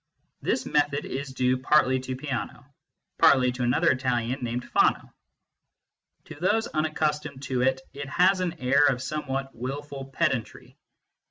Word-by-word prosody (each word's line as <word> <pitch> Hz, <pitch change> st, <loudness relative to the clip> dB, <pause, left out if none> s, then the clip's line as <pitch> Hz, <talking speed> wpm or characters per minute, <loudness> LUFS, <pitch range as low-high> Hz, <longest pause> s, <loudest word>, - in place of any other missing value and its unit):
This -, -, -1 dB
method 145 Hz, -1 st, +1 dB
is 135 Hz, +1 st, -5 dB
due 130 Hz, 0 st, +1 dB
partly 130 Hz, -1 st, +3 dB
to 130 Hz, 0 st, -5 dB
Peano, 135 Hz, -1 st, -5 dB, 0.5 s
partly 130 Hz, -2 st, +5 dB
to 125 Hz, 0 st, -6 dB
another 125 Hz, +8 st, +3 dB
Italian 125 Hz, -1 st, -1 dB
named 120 Hz, +1 st, -3 dB
Fano. -, -, +1 dB, 1.1 s
To -, -, -11 dB
those 210 Hz, +6 st, +1 dB
unaccustomed 150 Hz, -2 st, -2 dB
to 130 Hz, -2 st, -1 dB
it, 130 Hz, +1 st, +1 dB
it 140 Hz, 0 st, -7 dB
has 185 Hz, +6 st, +3 dB
an 180 Hz, -2 st, -1 dB
air 140 Hz, +3 st, +4 dB
of 130 Hz, -2 st, 0 dB
somewhat 135 Hz, -2 st, -3 dB
wilful 135 Hz, +3 st, -6 dB
pedantry. 135 Hz, -4 st, -2 dB
135 Hz, 140 wpm, -26 LUFS, 130-150 Hz, 1.1 s, partly